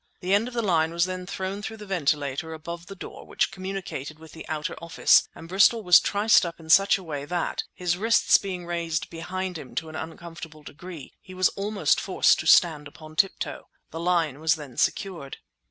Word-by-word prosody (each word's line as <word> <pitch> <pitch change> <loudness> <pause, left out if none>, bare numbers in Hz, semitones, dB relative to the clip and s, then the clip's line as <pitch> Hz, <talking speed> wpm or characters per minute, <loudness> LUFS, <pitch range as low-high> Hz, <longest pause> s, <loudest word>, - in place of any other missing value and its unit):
The 185 +1 0
end 210 +4 +3
of 250 - -8
the 235 - 0
line 165 -5 +2
was 170 +1 +1
then 185 0 -5
thrown 195 +1 -4
through 220 +1 -6
the 210 - -10
ventilator 155 -3 -1
above 170 +2 -8
the 195 - -9
door - - -9
which - - -1
communicated 185 -6 -6
with 160 0 -14
the 160 - -11
outer 155 -1 -3
office 170 0 +4
and 165 - -11
Bristol 200 +5 +4
was 180 -2 +8
triced 210 +2 +3
up 170 -1 -5
in 160 -1 -4
such 195 +4 +6
a 190 - -11
way 145 -4 -5
that, 175 +3 -2
his 175 -1 -1
wrists 225 +4 +4
being 185 -3 -5
raised 170 -2 -3
behind 180 +1 -4
him 130 - -11
to 160 - -3
an 155 - -9
uncomfortable 165 -1 -8
degree, 160 -1 -10
he 185 - -12
was 185 0 +3
almost 205 +1 0
forced - - +3
to - - -4
stand 155 -5 +5
upon 155 +1 -13
tiptoe. 195 +3 -1 0.2
The 165 - -6
line 165 -5 0
was 160 0 +2
then 145 -5 -10
secured. 170 -9 -2
170 Hz, 200 wpm, -25 LUFS, 160-190 Hz, 0.2 s, was